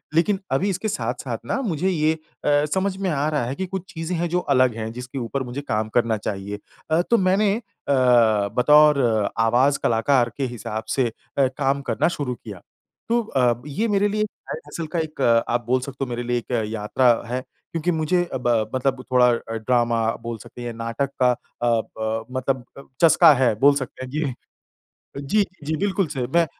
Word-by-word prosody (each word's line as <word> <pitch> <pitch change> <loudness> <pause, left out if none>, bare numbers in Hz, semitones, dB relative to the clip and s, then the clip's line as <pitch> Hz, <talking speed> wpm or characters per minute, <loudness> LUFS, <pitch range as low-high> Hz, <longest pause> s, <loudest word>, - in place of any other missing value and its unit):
लेकिन 190 +4 +3
अभी 160 +10 +1
इसके 195 +3 -2
साथ-साथ 125 - -3
ना 270 - -1
मुझे 185 - 0
ये 155 -3 +2
अ, 150 -2 -1
समझ 190 0 0
में 195 -1 -1
आ 150 -2 0
रहा 150 -5 0
है 130 - -3
कि 190 - -3
कुछ 190 0 -6
चीज़ें 165 +2 -3
हैं, 170 0 -1
जो 180 - +1
अलग 130 -7 +2
हैं, 110 0 -4
जिसके 125 +2 -8
ऊपर 130 +3 -3
मुझे 125 +3 -5
काम 110 -5 -2
करना 115 -2 +2
चाहिए। 100 0 -5 0.3
अ, 160 - +4
तो 235 +6 +2
मैंने 195 +1 +3
अ, - - -8 1.0
बतौर 150 +2 +6 0.4
आवाज़ 125 +5 +3
कलाकार 120 +2 +2
के 140 - -1
हिसाब 110 0 -4
से 130 -3 +2 0.3
अ, 135 -2 +4
काम 135 +2 -1
करना 115 - +2
शुरू 125 -4 -2
किया, 105 -6 -10 0.5
तो 235 0 +3
अ, 125 - +1
ये 210 +11 -1
मेरे 205 -1 +2
लिए 210 +1 -1
एक 215 - 0 0.2
साइड 475 - -4
हसल 165 - -5
का 170 - +1
एक, 155 -1 -4 0.3
आप 120 -1 0
बोल 130 +2 +2
सकते 135 +1 -5
हो, 130 - -4
मेरे 120 0 -3
लिए 120 0 0
एक 120 - -6 0.2
यात्रा 115 +3 +2 0.2
है। 125 +2 -2 0.3
क्योंकि 165 +2 0
मुझे 160 +2 +1
ब 125 - -2
अ, 110 -2 +1
मतलब 130 0 -1
थोड़ा 125 -1 +5 0.3
ड्रामा 120 0 +1 0.2
बोल 115 0 -5
सकते 115 +3 -12
हैं, 120 -1 -4
नाटक 115 +4 -3
का 125 -1 +5
अ, - - 0 0.6
ब 110 0 -2
मतलब 130 -1 -2 0.4
चस्का 165 -2 +7
है 130 -4 +2
बोल 140 +2 +6
सकते 130 -1 -5
हैं। 130 - -11
ये 150 -3 -1 0.9
जी, 205 +10 +2 0.2
जी, 155 +2 -1
बिल्कुल 195 +1 0
सही, 135 -4 -3
ब 170 +6 +2
135 Hz, 195 wpm, -23 LUFS, 120-165 Hz, 1.0 s, चस्का